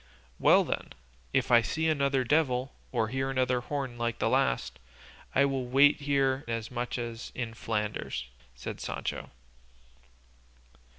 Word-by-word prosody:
"Well - - +6
then, - - -4 0.4
if - - +1
I 120 -1 +8
see 160 +7 -1
another 140 -4 +2
devil 130 -1 +1 0.2
or 110 - 0
hear 135 +2 -1
another 130 -1 +1
horn 130 -3 -4
like 120 -1 -1
the - - +1
last, 60 - +1 0.6
I'll 135 -1 +3
wait 140 +4 +5
here 140 -1 +1
as 115 0 -3
much 120 0 -3
as 115 -1 -5
in 120 -3 -3
Flanders," 105 - -3 0.3
said - - -6
Sancho. - - -4
130 Hz, 130 wpm, -29 LUFS, 115-140 Hz, 0.6 s, I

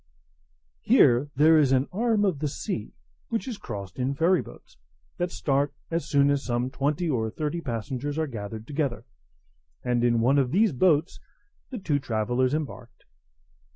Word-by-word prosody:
Here 125 - +4
there 155 +3 +6
is 140 -3 +3
an 135 +1 +2
arm 215 +1 +1
of 180 -8 0
the 150 - -1
sea, 140 - -5 0.3
which 230 +3 -2
is 230 -5 -5
crossed 100 - -7
in 130 +2 -1
ferry 170 +4 +3
boats, - - -14 0.4
that 175 0 -1
start 140 -2 0 0.2
as 165 0 -2
soon 140 0 +4
as 140 -1 0
some 120 +1 -1
twenty 145 +6 -1
or 115 -7 0
thirty 155 +7 -3
passengers 130 +3 -4
are 160 - +1
gathered 110 -4 -7
together; 140 -3 -2 0.8
and 120 -1 0
in 120 -1 +3
one 130 +5 +3
of 130 -3 +1
these 200 - +3
boats 160 +3 +2 0.5
the 255 - -5
two 155 -8 0
travellers 125 +2 0
embarked. 130 -6 -6
140 Hz, 160 wpm, -26 LUFS, 120-160 Hz, 0.8 s, there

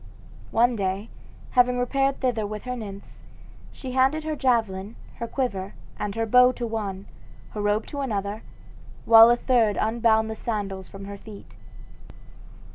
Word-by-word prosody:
One 240 +1 +3
day, 195 +1 -2 0.4
having 250 -1 +3
repaired 270 +2 0
thither 235 -5 0
with 210 0 -6
her 250 0 -4
nymphs, 200 -4 -9 0.5
she 260 - -8
handed 265 +5 +2
her 310 0 -3
javelin, 225 -6 0 0.2
her 235 - -4
quiver, 200 -7 -3 0.2
and 205 0 -3
her 225 0 0
bow 250 +3 +5
to 240 - -4
one, 205 -4 -4 0.5
her 210 - -5
robe 205 +1 +1
to 285 - -5
another, 210 -4 -3 0.6
while 225 0 +9
a 240 - +5
third 235 -5 +2
unbound 220 0 +2
the 220 - -5
sandals 200 -4 -4
from 195 0 -10
her 200 0 -8
feet. 210 -1 -12
225 Hz, 150 wpm, -25 LUFS, 205-250 Hz, 0.6 s, while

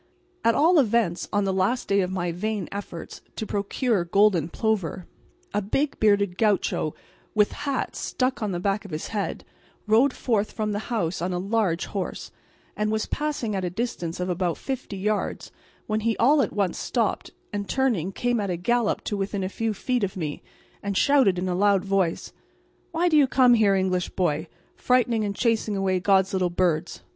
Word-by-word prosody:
At 230 - +4
all 330 +2 +5
events 220 -8 +1
on 205 -1 +1
the 195 -1 0
last 195 +7 0
day 200 0 +3
of 180 - -1
my 175 -2 -2
vain 205 +1 -3
efforts 195 -4 -7
to 220 - -3
procure 205 0 0
golden 175 -2 +3
plover, 190 -5 -1 0.5
a 205 - +1
big, 275 +9 -1
bearded 200 -3 +2
gaucho, 205 -7 +1 0.4
with 210 -1 +4
hat 280 -2 -3
stuck 255 -1 -1
on 210 -2 -1
the 175 - -2
back 200 +3 0
of 200 - -10
his 155 -1 -5
head, 205 -3 -3 0.4
rode 230 +6 +4
forth 220 -5 -1
from 215 -1 -2
the 205 +1 -4
house 185 -8 -1
on 180 +1 -1
a - - -1
large 195 -2 0
horse, 195 -3 -5 0.4
and 210 0 0
was 220 0 0
passing 290 -8 -2
at 190 - -2
a 180 - -1
distance 180 -5 -3
of 180 - -1
about 180 -1 -1
fifty 260 -7 -5
yards 210 +2 -2 0.3
when 215 0 0
he 225 0 0
all 285 +5 +5
at 235 - 0
once 200 -4 -1
stopped, 230 -4 -1 0.2
and 200 -1 -3
turning 230 -10 +1
came 245 +3 0
at 200 -2 -2
a 175 - -1
gallop 235 +5 0
to 210 - -2
within 195 0 -2
a 185 - -2
few 225 +2 -2
feet 245 +3 -1
of 195 -1 -2
me 155 -4 -4 0.4
and 200 -1 -2
shouted 265 -10 +4
in 180 +1 -2
a 180 - 0
loud 200 +1 +3
voice: 195 -4 0 0.6
"Why 340 +2 +1
do 325 - +3
you 290 -3 +6
come 255 -2 +5
here, 210 -4 +4
English 185 -2 0
boy, 160 -3 -1 0.3
frightening 240 -3 +2
and 200 -1 -2
chasing 225 -3 0
away 190 -1 +1
God's 190 +1 +3
little 185 -2 +1
birds? 175 -2 -1
205 Hz, 190 wpm, -25 LUFS, 185-230 Hz, 0.6 s, you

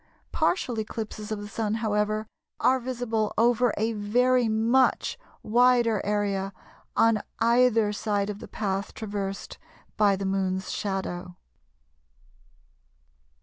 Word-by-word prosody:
Partial 245 -10 0
eclipses 215 -1 -5
of 215 - -1
the 205 - -7
Sun, 215 0 -2
however, 215 -1 0 0.3
are 260 +1 +3
visible 235 -4 -2
over 240 +1 +3
a 225 +2 0
very 240 +3 +2
much 230 +4 +2 0.3
wider 240 -1 +3
area 200 -1 -1 0.4
on 225 -1 +4 0.2
either 230 -2 +3
side 205 -1 -1
of 205 - -8
the - - -9
path 195 -1 -3
traversed 200 -2 -5 0.4
by 205 -2 +4
the 195 +1 -4
Moon's 190 -1 -1
shadow. 185 -3 -4
215 Hz, 110 wpm, -26 LUFS, 205-230 Hz, 0.4 s, on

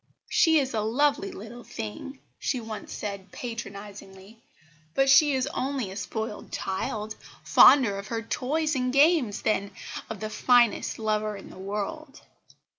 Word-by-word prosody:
"She 320 -1 +5
is 270 -3 0
a 220 - 0
lovely 290 - +1
little 240 -9 -10
thing," 110 - -7 0.2
she 260 - -1
once 220 -2 -7
said 200 -2 -6
patronisingly, 205 -2 -8 0.5
"but 270 0 +4
she 295 0 +6
is 260 - +1
only 260 -7 -3
a - - -8
spoiled 220 +2 -5
child, 210 +3 -3 0.3
fonder 230 -8 +6
of 200 - -8
her 230 -1 -3
toys 305 +7 -1
and 255 -2 0
games 275 - +3
than 200 -2 +1 0.4
of 220 - -6
the 215 0 -5
finest 240 -3 +3
lover 215 -1 -1
in 195 - -11
the - - -12
world." 210 +10 -5
225 Hz, 145 wpm, -27 LUFS, 205-270 Hz, 0.5 s, she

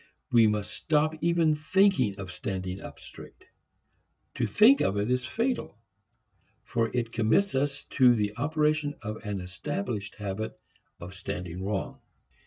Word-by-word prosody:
We 115 -2 +6
must 105 -1 -1
stop 155 0 +1
even 170 -2 +3
thinking 155 - +2
of 95 -2 -6
standing 95 0 -4
up - - -10
straight. - - -13 0.9
To - - -1
think 245 +6 +6
of 100 - +1
it 105 +4 0
is 125 0 0
fatal, 235 - -2 0.9
for 115 -1 0
it 120 -2 -2
commits 115 - +2
us 140 +1 -1
to 125 -2 +5
the 105 -1 -1
operation 150 +2 0
of 110 -1 -6
an 105 -2 -3
established 100 +3 -4
habit 105 +1 -5 0.4
of 90 +2 -9
standing 90 -2 -5
wrong. 100 0 -3
115 Hz, 140 wpm, -28 LUFS, 100-150 Hz, 0.9 s, We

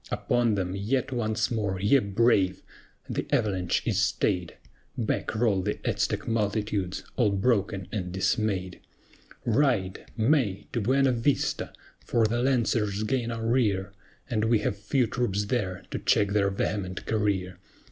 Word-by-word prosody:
Upon 120 -3 +1
them 95 -1 -2
yet 125 +7 -1
once 110 -3 -1
more, 100 -5 -1
ye 105 +8 +4
brave! 100 -3 +2 0.4
The - - -3
avalanche 95 -4 +1
is - - +1
stayed! 90 -1 0 0.4
Back 115 -1 -1
roll 110 -4 +2
the - - -2
Aztec - - -1
multitudes, 105 -4 -1
all - - +4
broken 100 -2 0
and 90 -4 -3
dismayed. 95 -1 -1 0.7
Ride! 115 -6 +1
MAY! 115 -4 +2
To 120 - 0
Buena 135 +5 +3
Vista! 125 +3 0 0.3
for 115 -2 +2
the 120 +2 0
Lancers 115 -5 +1
gain 120 +1 -1
our 115 -1 -4
rear, 105 -5 +1 0.3
And 110 -2 0
we 115 0 +4
have - - 0
few 105 +6 +1
troops 105 -4 -1
there 100 -5 -2
to - - -2
check 100 - +2
their 100 -1 +2
vehement 95 -1 -3
career. 95 -4 -1
105 Hz, 140 wpm, -27 LUFS, 95-120 Hz, 0.7 s, ye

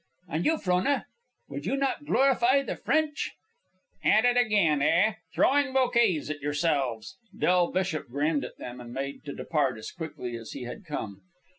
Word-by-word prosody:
"And 165 0 -1
you, 320 0 +3
Frona, 185 +6 +1 0.4
would - - -6
you 275 - 0
not 275 +2 -1
glorify 270 -1 +3
the - - -4
French!" 310 -1 0 0.7
"At 215 +3 +4
it 245 0 +4
again, 205 -11 +3
eh? 175 +9 +3 0.2
Throwing 280 -1 +2
bouquets 235 - +2
at 145 -1 -6
yourselves." 145 -1 -1 0.2
Del 180 -1 +3
Bishop 185 -6 -1
grinned 145 +3 0
at - - -8
them, 125 0 -8
and 120 -1 -10
made 135 +2 -5
to 140 - -6
depart 145 -7 0
as 110 0 -7
quickly 150 -8 -6
as 115 -1 -9
he 135 - -6
had 125 - -8
come. 105 - -5
170 Hz, 165 wpm, -28 LUFS, -, 0.7 s, At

